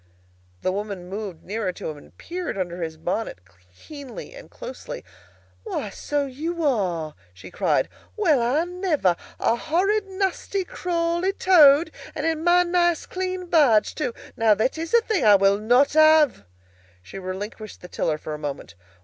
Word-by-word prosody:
The 185 - +1
woman 195 -2 -5
moved 195 -4 -6
nearer 205 -1 -2
to - - -7
him - - -9
and 145 - -17
peered 355 - -5
under 175 -1 -3
his 160 -1 -4
bonnet 180 - -3 0.4
keenly 285 - -10
and - - -12
closely. - - -8 0.6
"Why, 315 - -4
so 290 +5 -2
you 320 +6 -4
are!" 180 - 0 0.2
she 90 - -12
cried. - - +1 0.3
"Well, 320 - +3
I 255 +7 +2
never! 350 - 0 0.2
A 230 - +2
horrid, 390 - 0
nasty, 385 0 -2
crawly 345 +2 -1
Toad! 320 -5 +6 0.2
And 300 - -3
in 320 -1 0
my 350 +1 +5
nice 345 -1 +1
clean 370 0 -4
barge, 285 -11 +4
too! 260 -6 -2 0.2
Now 225 -2 +4
that 220 +5 0
is 325 +1 -5
a 470 - +6
thing 435 -6 -1
that 215 -4 +6
I - - +8
will 195 +1 +3
not 245 +7 +3
have." 310 - +5 0.6
She 95 - -9
relinquished 205 +3 -7
the 180 - -9
tiller 155 -3 -1
for 155 0 -7
a 150 - -6
moment. 140 - -6
285 Hz, 165 wpm, -24 LUFS, -, 0.6 s, I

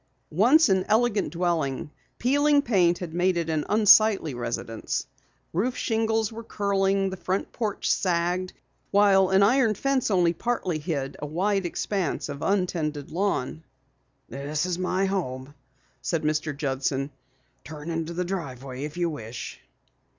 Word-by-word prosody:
Once 255 - +5
an 190 -2 +2
elegant 215 -6 +2
dwelling, 160 -5 -1 0.3
peeling 285 +3 +3
paint 180 -8 +3
had 175 -3 -7
made 180 +1 +2
it 165 -1 -1
an 155 -2 0
unsightly 210 -6 +5
residence. 115 -2 -3 0.5
Roof 235 +9 0
shingles 225 -1 0
were 225 +1 -7
curling, 195 -2 0
the - - -4
front 185 +2 -2
porch 215 -4 -3
sagged, 180 0 0 0.4
while 195 -2 +4
an 190 +1 +4
iron 230 0 +3
fence 270 +3 0
only 175 -4 +3
partially 185 -5 -2
hid 145 -4 -3
a 150 - -4
wide 190 +4 0
expanse 180 -3 -2
of 140 0 -6
untended 165 -7 -1
lawn. 165 -5 -1 0.6
"This 145 +5 -3
is 180 -1 -2
my 185 +1 0
home," 145 -8 -3 0.5
said 165 -3 -1
Mr. 155 -1 -1
Judson. 135 -1 -1 0.5
"Turn 155 +2 -7
into 165 0 -3
the 180 +1 -1
driveway 135 -7 -5
if 150 +2 -8
you 175 -1 +1
wish." 120 -6 -7
180 Hz, 140 wpm, -26 LUFS, 150-200 Hz, 0.6 s, Once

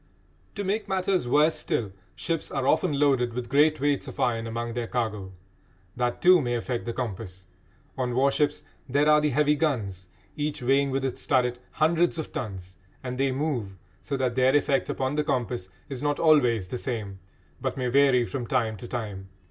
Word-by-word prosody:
To 205 - -3
make 205 +3 -1
matters 190 -6 0
worse 150 +5 +4
still, 105 -5 -2 0.2
ships 165 - -2
are 135 -1 -2
often 145 -2 +2
loaded 130 -5 +2
with 125 -1 -4
great 150 +3 +4
weights 145 0 0
of - - -9
iron 115 -2 0
among 115 +1 -4
their 120 -1 -3
cargo. 105 -6 -3 0.6
That, 120 0 -2
too, 180 -1 +7
may 120 -2 -1
affect 120 +1 -3
the 120 - -2
compass. 95 -6 -5 0.5
On 125 -1 -1
warships 140 +2 +2 0.3
there 145 +3 +2
are 150 0 +6
the 150 - +2
heavy 150 +2 +3
guns, 110 - -2 0.3
each 145 -3 -3
weighing, 135 +2 +3
with 135 0 -1
its 130 - -4
turret, 125 -4 +2
hundreds 165 +2 +2
of 160 - -5
tons, 95 -5 -6 0.3
and 125 0 -5
they 135 0 +2
move, 130 -9 -2 0.2
so 140 - -3
that 130 -2 0
their 130 +2 +3
effect 140 -2 +2
upon 130 +1 -1
the 150 0 +1
compass 125 -9 -2 0.2
is 135 -3 -5
not 145 0 0
always 125 - +3
the 125 - -4
same, 105 -6 -4 0.4
but - - -2
may 130 - -2
vary 130 -1 +4
from 120 -1 -4
time 115 -4 0
to 120 - -9
time. 105 -6 -5
130 Hz, 185 wpm, -26 LUFS, 115-145 Hz, 0.6 s, too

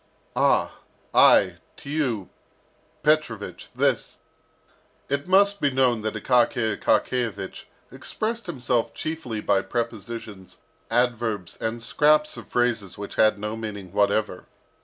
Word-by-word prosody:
"Ah! - - +2 0.3
I - - +6 0.2
to - - -14
you, 125 - -1 0.7
Petrovich, 150 -9 0
this - - 0 0.5
" - - -36
It 140 +2 -1
must 200 +2 +4
be 145 - +3
known 130 -4 +2
that 110 0 -3
Akaky 115 -1 +2
Akakiyevich 110 -6 -1 0.3
expressed 230 0 -3
himself 125 -7 -1
chiefly 155 -9 -4
by 100 -2 +2
prepositions, 115 -2 -5 0.3
adverbs, 115 -5 0
and 115 +1 -3
scraps 150 +5 +3
of - - -10
phrases 115 -6 0
which 100 - -7
had 110 -1 +3
no 105 +2 -4
meaning 100 -5 -7
whatever. 100 -2 +1
115 Hz, 115 wpm, -24 LUFS, 105-135 Hz, 0.7 s, I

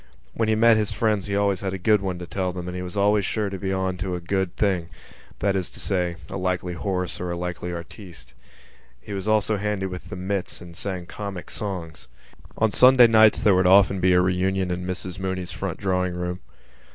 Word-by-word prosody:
When 115 -1 0
he 110 - +3
met 115 0 +5
his 105 -2 0
friends 105 -2 0
he 100 - -3
had 100 - +2
always 100 -2 +1
a 95 -1 -2
good 105 +2 +3
one 95 -2 -3
to 90 - -7
tell 95 +1 -2
them 90 -1 -6
and 90 - -5
he 90 - -4
was 90 +2 -6
always 100 +1 +3
sure 105 +1 -1
to 95 - -4
be 95 +1 -2
on 95 -1 -1
to 90 0 -3
a - - -3
good 95 +1 -2
thing—that 95 +1 -3
is 95 -2 -1
to - - -8
say, 90 -3 -1
a - - -5
likely 90 -1 -2
horse 90 0 -2
or 90 - -3
a 85 - -3
likely 90 0 -4
artiste. 85 - -9 0.7
He 100 - -9
was 95 +1 -4
also 110 0 +2
handy 105 -1 -2
with 90 -1 -7
the - - -6
mits 95 +1 -3
and 85 -1 -12
sang 95 -1 -4
comic 100 -1 -7
songs. 90 - -6 0.5
On 110 -1 +2
Sunday 125 +1 +7
nights 110 -1 +5
there 105 - +5
would 90 0 +3
often 95 0 +5
be 90 0 +3
a 90 - +5
reunion 95 +1 0
in 90 0 -3
Mrs 95 0 -4
Mooney's 95 -2 -3
front 90 +1 -4
drawing 90 -2 -1
room. 90 0 -3
95 Hz, 220 wpm, -24 LUFS, 90-100 Hz, 0.7 s, Sunday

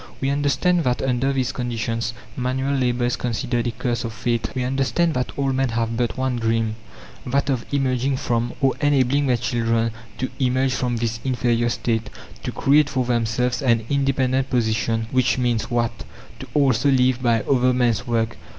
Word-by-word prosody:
We 135 0 0
understand 145 +5 +1
that 125 -1 0
under 130 +1 +1
these 130 -3 0
conditions 115 -1 -3 0.2
manual 130 +2 -1
labour 125 -2 +1
is 120 - 0
considered 120 0 -2
a - - 0
curse 120 0 -2
of 115 -2 -4
fate. 115 +1 -1
We 130 - -1
understand 135 +6 +1
that 125 -2 -2
all 135 -1 +1
men 135 0 +1
have 115 0 -1
but 120 0 -1
one 130 -1 0
dream 115 -1 0 0.5
that 140 +2 0
of 125 -3 -2
emerging 135 -1 +1
from, 120 -3 -1
or 135 -1 +3
enabling 140 -1 +2
their 125 -2 +3
children 115 0 0 0.3
to 130 - -3
emerge 130 0 +1
from 120 -1 -1
this 115 -1 -2
inferior 120 -2 +1
state; 115 -2 -1 0.3
to - - -4
create 145 +2 +3
for 130 -1 0
themselves 120 +1 0
an 115 -4 +2
"independent" 135 -1 +1
position, 115 -1 0
which 130 -1 +2
means 120 -1 0
what? 120 -1 -1 0.4
To - - -8
also 140 -2 +3
live 130 -1 +3
by 115 -3 +2
other 130 -2 +3
men's 120 -1 +1
work! 115 -1 0
125 Hz, 175 wpm, -22 LUFS, 115-135 Hz, 0.5 s, or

